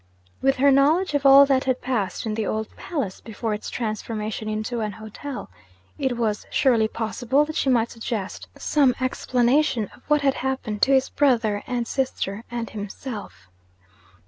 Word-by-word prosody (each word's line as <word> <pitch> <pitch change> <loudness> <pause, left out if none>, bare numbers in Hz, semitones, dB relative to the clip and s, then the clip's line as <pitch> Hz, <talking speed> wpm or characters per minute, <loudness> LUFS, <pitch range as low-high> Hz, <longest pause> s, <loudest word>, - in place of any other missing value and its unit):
With 270 0 +3
her 280 +1 +4
knowledge 300 +6 +3
of 285 -1 +3
all 275 +1 +9
that 270 -1 +2
had 260 -1 +1
passed 225 -8 -2
in 220 - -1
the 215 -1 -2
old 220 0 -3
palace, 275 - -4
before 220 0 -4
its 210 - -5
transformation 215 -1 -3
into 215 +3 -2
an 210 -2 -2
hotel, 220 - -8 0.5
it 265 -4 0
was 215 -3 -1
surely 235 -5 +3
possible 245 +6 0
that 310 0 -7
she 270 - +1
might 235 -3 +2
suggest 225 -4 -5
some 275 -4 +2
explanation 255 -2 +1
of - - -21
what 300 -1 +3
had 275 -1 +3
happened 255 -5 -3
to 275 - +4
his 265 0 +3
brother, 230 -7 +2
and 245 -2 -2
sister, 230 -6 -2
and 235 -1 -4
himself. 205 - -7
240 Hz, 165 wpm, -24 LUFS, 215-270 Hz, 0.5 s, all